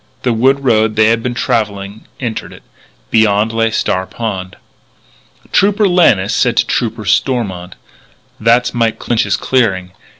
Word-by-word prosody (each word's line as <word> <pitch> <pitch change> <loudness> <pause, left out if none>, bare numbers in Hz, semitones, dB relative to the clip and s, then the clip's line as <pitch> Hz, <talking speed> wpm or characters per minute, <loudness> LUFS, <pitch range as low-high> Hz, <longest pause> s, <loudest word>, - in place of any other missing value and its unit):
The 125 - +1
wood 135 +4 +2
road 110 -3 +2
they 110 0 +4
had 115 0 +1
been 120 +1 -3
travelling 105 -3 -2
entered 115 -4 -4
it. - - -15 0.5
Beyond 110 0 +2
lay 115 0 +1
Star 95 -4 -1
Pond. 95 -5 -5 1.0
Trooper 205 +1 +3
Lannis 120 - +3
said 125 -2 +1
to - - +3
Trooper 115 -2 -2
Stormont: 100 -4 -1 0.6
"That's 115 +3 +2
Mike 115 -2 0
Clinch's 110 -4 0
clearing. 95 -8 0
115 Hz, 135 wpm, -14 LUFS, 100-120 Hz, 1.0 s, they